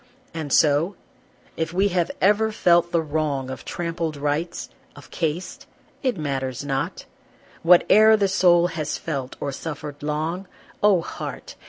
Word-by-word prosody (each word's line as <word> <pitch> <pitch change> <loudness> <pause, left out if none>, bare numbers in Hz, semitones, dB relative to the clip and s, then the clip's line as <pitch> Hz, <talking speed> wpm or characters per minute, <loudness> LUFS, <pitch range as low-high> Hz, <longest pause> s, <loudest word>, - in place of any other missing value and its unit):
And 160 -3 -5
so 155 +7 +3 0.6
if 165 0 -3
we 195 +3 +2
have 175 -2 0
ever 210 +3 +3
felt 175 -5 +3
the 165 -1 +1
wrong 145 -4 -2
Of 130 - -7
Trampled 165 -3 -3
rights, 150 +4 -2 0.3
of 145 - -14
caste, 165 +2 -3 0.3
it 255 -7 0
matters 135 -3 -3
not, 135 -1 -3 0.6
What 175 +1 +6
e'er 220 +1 +7
the 200 -2 +2
soul 175 -2 +4
has 155 -3 -3
felt 135 -5 -4
or 140 - -3
suffered 145 0 -7
long, 155 +5 -3 0.3
Oh, 205 -4 +4
heart! - - -7
165 Hz, 145 wpm, -23 LUFS, 145-180 Hz, 0.6 s, e'er